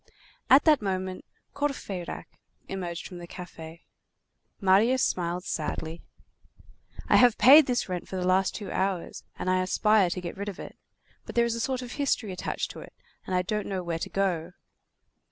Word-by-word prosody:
At 270 Hz, +3 st, +7 dB
that 305 Hz, -5 st, +5 dB
moment, 185 Hz, -2 st, -3 dB, 0.3 s
Courfeyrac 255 Hz, -11 st, -4 dB, 0.4 s
emerged 175 Hz, -3 st, -5 dB
from 180 Hz, -, -9 dB
the 175 Hz, -, -9 dB
café. 165 Hz, -2 st, -10 dB, 0.8 s
Marius 215 Hz, +6 st, +4 dB
smiled 175 Hz, 0 st, -1 dB
sadly. 160 Hz, +1 st, -4 dB, 1.1 s
"I -, -, +5 dB
have 245 Hz, -3 st, +5 dB
paid 275 Hz, +6 st, +8 dB
this 245 Hz, -1 st, 0 dB
rent 180 Hz, -2 st, -4 dB
for -, -, -7 dB
the 180 Hz, -1 st, -2 dB
last 185 Hz, +1 st, +2 dB
two 205 Hz, -, -6 dB
hours, 190 Hz, -2 st, -2 dB
and -, -, -5 dB
I 185 Hz, 0 st, +2 dB
aspire 200 Hz, +1 st, +3 dB
to 180 Hz, -, -3 dB
get 175 Hz, -1 st, -6 dB
rid 200 Hz, +1 st, -4 dB
of 195 Hz, -, -9 dB
it; -, -, -9 dB, 0.5 s
but -, -, -8 dB
there 235 Hz, 0 st, +4 dB
is 235 Hz, -, -1 dB
a 230 Hz, -, -3 dB
sort 255 Hz, +1 st, -1 dB
of 245 Hz, -, -8 dB
history 250 Hz, -7 st, -1 dB
attached 180 Hz, -, -3 dB
to -, -, -10 dB
it, -, -, -12 dB, 0.3 s
and 185 Hz, -, -1 dB
I 180 Hz, -, +2 dB
don't 210 Hz, +3 st, -2 dB
know 190 Hz, -2 st, -3 dB
where 170 Hz, -1 st, -3 dB
to -, -, -4 dB
go." 180 Hz, -3 st, -1 dB
190 Hz, 180 wpm, -27 LUFS, 180-230 Hz, 1.1 s, paid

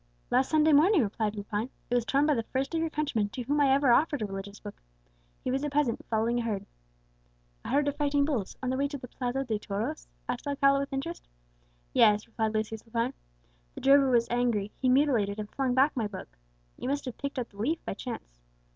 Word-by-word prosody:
"Last 255 Hz, +2 st, +3 dB
Sunday 310 Hz, 0 st, +4 dB
morning," 320 Hz, -, +5 dB
replied 210 Hz, 0 st, -2 dB
Lepine. 205 Hz, +3 st, -3 dB, 0.2 s
"It -, -, +1 dB
was 240 Hz, -2 st, +2 dB
torn 280 Hz, +3 st, +2 dB
by 300 Hz, -, +3 dB
the 235 Hz, -, 0 dB
first 265 Hz, +6 st, -3 dB
of 325 Hz, -, +1 dB
your 325 Hz, -, 0 dB
countrymen 280 Hz, -10 st, -1 dB
to 250 Hz, -, -5 dB
whom 290 Hz, +4 st, +1 dB
I 275 Hz, -2 st, +4 dB
ever 275 Hz, -1 st, +4 dB
offered 290 Hz, 0 st, +3 dB
a -, -, 0 dB
religious 200 Hz, +1 st, -7 dB
book. 205 Hz, -1 st, -10 dB, 0.6 s
He 255 Hz, -, -1 dB
was 270 Hz, +2 st, -1 dB
a 295 Hz, -, 0 dB
peasant, 285 Hz, -5 st, 0 dB
following 230 Hz, +2 st, +1 dB
a -, -, 0 dB
herd." 210 Hz, -4 st, -2 dB, 1.0 s
"A -, -, -6 dB
herd 285 Hz, +2 st, +2 dB
of 285 Hz, -, -1 dB
fighting 285 Hz, -1 st, +2 dB
bulls 250 Hz, -10 st, -2 dB
on 255 Hz, -, 0 dB
the 260 Hz, -, -1 dB
way 280 Hz, +1 st, +1 dB
to 285 Hz, 0 st, -5 dB
the 250 Hz, -, -9 dB
Plaza 255 Hz, +2 st, -2 dB
de 220 Hz, -5 st, -2 dB
Toros?" 200 Hz, -, -4 dB, 0.2 s
asked -, -, -4 dB
Alcala 275 Hz, -1 st, +3 dB
with 280 Hz, +1 st, -3 dB
interest. 280 Hz, +6 st, -4 dB, 0.7 s
"Yes," 210 Hz, 0 st, +5 dB
replied 220 Hz, -1 st, -2 dB
Lucius 215 Hz, 0 st, -2 dB
Lepine. 235 Hz, +3 st, -1 dB, 0.6 s
"The -, -, -7 dB
drover 275 Hz, 0 st, +6 dB
was 235 Hz, -2 st, +3 dB
angry; 235 Hz, -4 st, +1 dB
he 260 Hz, -, +3 dB
mutilated 250 Hz, -7 st, +3 dB
and 210 Hz, -1 st, -6 dB
flung 260 Hz, -2 st, 0 dB
back 270 Hz, +3 st, +4 dB
my 230 Hz, -4 st, 0 dB
book. 195 Hz, -3 st, -9 dB, 0.4 s
You 255 Hz, -, -3 dB
must 285 Hz, +1 st, -1 dB
have 255 Hz, -, -6 dB
picked 280 Hz, 0 st, -4 dB
up 245 Hz, -2 st, -2 dB
the 200 Hz, -, -20 dB
leaf 295 Hz, +11 st, -1 dB
by -, -, -2 dB
chance." 195 Hz, -, -8 dB
255 Hz, 225 wpm, -29 LUFS, 220-280 Hz, 1.0 s, drover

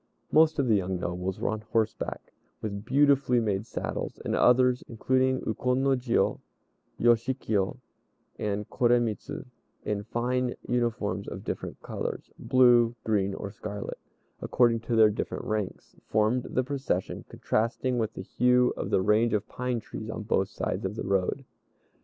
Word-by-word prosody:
Most 155 Hz, 0 st, +5 dB
of 140 Hz, -3 st, +1 dB
the 115 Hz, -, +4 dB
young 95 Hz, -2 st, -1 dB
nobles 90 Hz, +2 st, -3 dB
were -, -, 0 dB
on 110 Hz, 0 st, -2 dB
horseback, 110 Hz, 0 st, -2 dB, 0.3 s
with 100 Hz, -1 st, -5 dB
beautifully 140 Hz, -1 st, +4 dB
made 105 Hz, -1 st, -1 dB
saddles; -, -, -4 dB
and -, -, 0 dB
others, 125 Hz, 0 st, +4 dB
including 130 Hz, +3 st, +1 dB
Ukon 125 Hz, +4 st, 0 dB
no 135 Hz, -, +3 dB
Jiô, 125 Hz, -2 st, +1 dB, 0.6 s
Yoshikiyo, 115 Hz, -4 st, +1 dB, 0.6 s
and 105 Hz, 0 st, -2 dB
Koremitz, 120 Hz, -4 st, +1 dB, 0.6 s
in 105 Hz, -1 st, -1 dB
fine 125 Hz, +2 st, -1 dB
uniforms 120 Hz, -2 st, -1 dB
of -, -, -6 dB
different -, -, -5 dB
colors -, -, -5 dB
(blue, 120 Hz, -2 st, +5 dB
green, 100 Hz, -3 st, +1 dB
or 100 Hz, -, -6 dB
scarlet), 105 Hz, 0 st, -6 dB, 0.4 s
according 120 Hz, -2 st, +3 dB
to 115 Hz, +1 st, -2 dB
their 110 Hz, -1 st, +6 dB
different 105 Hz, -, -4 dB
ranks, 110 Hz, -4 st, -4 dB
formed 110 Hz, +4 st, +1 dB
the 130 Hz, -, +1 dB
procession, 130 Hz, -8 st, -2 dB
contrasting 115 Hz, +3 st, -1 dB
with 110 Hz, -1 st, -1 dB
the 95 Hz, -, -6 dB
hue 125 Hz, +4 st, +3 dB
of -, -, -4 dB
the 95 Hz, -, +2 dB
range 110 Hz, +3 st, +3 dB
of 105 Hz, -, 0 dB
pine 125 Hz, -1 st, -2 dB
trees 110 Hz, 0 st, -8 dB
on 110 Hz, -, -4 dB
both 95 Hz, -3 st, +1 dB
sides -, -, -3 dB
of 95 Hz, +2 st, -3 dB
the -, -, -4 dB
road. 100 Hz, +8 st, 0 dB
115 Hz, 150 wpm, -28 LUFS, 105-125 Hz, 0.6 s, their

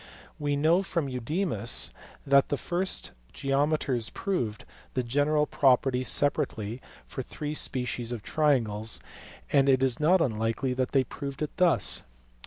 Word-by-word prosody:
We 145 Hz, -1 st, -1 dB
know 160 Hz, +6 st, +3 dB
from 170 Hz, -6 st, -2 dB
Eudemus 125 Hz, -, +1 dB, 0.3 s
that 140 Hz, 0 st, +4 dB
the 145 Hz, -, 0 dB
first 180 Hz, +5 st, -2 dB, 0.2 s
geometers 135 Hz, -4 st, 0 dB
proved 120 Hz, -, -3 dB, 0.3 s
the 130 Hz, -, 0 dB
general 145 Hz, +5 st, +1 dB
property 130 Hz, -2 st, +2 dB
separately 120 Hz, -3 st, 0 dB, 0.2 s
for -, -, -6 dB
three 150 Hz, +4 st, -6 dB
species 125 Hz, -4 st, -2 dB
of 115 Hz, -4 st, -5 dB
triangles, 115 Hz, -7 st, +1 dB, 0.5 s
and 140 Hz, -1 st, +4 dB
it 130 Hz, -1 st, +3 dB
is 130 Hz, -3 st, +1 dB
not 175 Hz, +5 st, +4 dB
unlikely 115 Hz, -1 st, -1 dB
that 125 Hz, 0 st, -2 dB
they 135 Hz, -2 st, +4 dB
proved 140 Hz, +3 st, -6 dB
it 150 Hz, -, -5 dB
thus. 170 Hz, -, +4 dB
135 Hz, 135 wpm, -27 LUFS, 120-150 Hz, 0.5 s, that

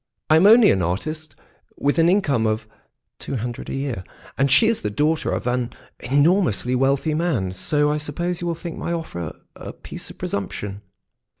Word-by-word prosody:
" -, -, -55 dB
I 155 Hz, -, +7 dB
am 180 Hz, +5 st, +6 dB
only 225 Hz, 0 st, +8 dB
an 95 Hz, -, +1 dB
artist 155 Hz, -, -3 dB, 0.4 s
with 145 Hz, +4 st, +1 dB
an 165 Hz, +1 st, +5 dB
income 145 Hz, -, +2 dB
of 110 Hz, 0 st, -1 dB, 0.5 s
two 140 Hz, -, -5 dB
hundred 120 Hz, 0 st, -4 dB
a -, -, -3 dB
year, 135 Hz, -8 st, -3 dB, 0.3 s
and 140 Hz, +1 st, +2 dB
she 220 Hz, -, +6 dB
is 230 Hz, -1 st, +1 dB
the 105 Hz, -, -1 dB
daughter 155 Hz, +9 st, 0 dB
of -, -, -2 dB
an 125 Hz, -1 st, -1 dB, 0.3 s
enormously 145 Hz, -, +2 dB
wealthy 135 Hz, +4 st, +1 dB
man, 150 Hz, -, 0 dB
so 150 Hz, -, +1 dB
I 150 Hz, -, 0 dB
suppose 170 Hz, +4 st, -3 dB
you 175 Hz, -, -2 dB
will 170 Hz, -, -1 dB
think 170 Hz, 0 st, -7 dB
my 170 Hz, -, -2 dB
offer 85 Hz, -, -5 dB, 0.2 s
a -, -, -8 dB
piece -, -, -9 dB
of -, -, -12 dB
presumption." 100 Hz, +1 st, -4 dB
145 Hz, 190 wpm, -22 LUFS, 115-165 Hz, 0.5 s, only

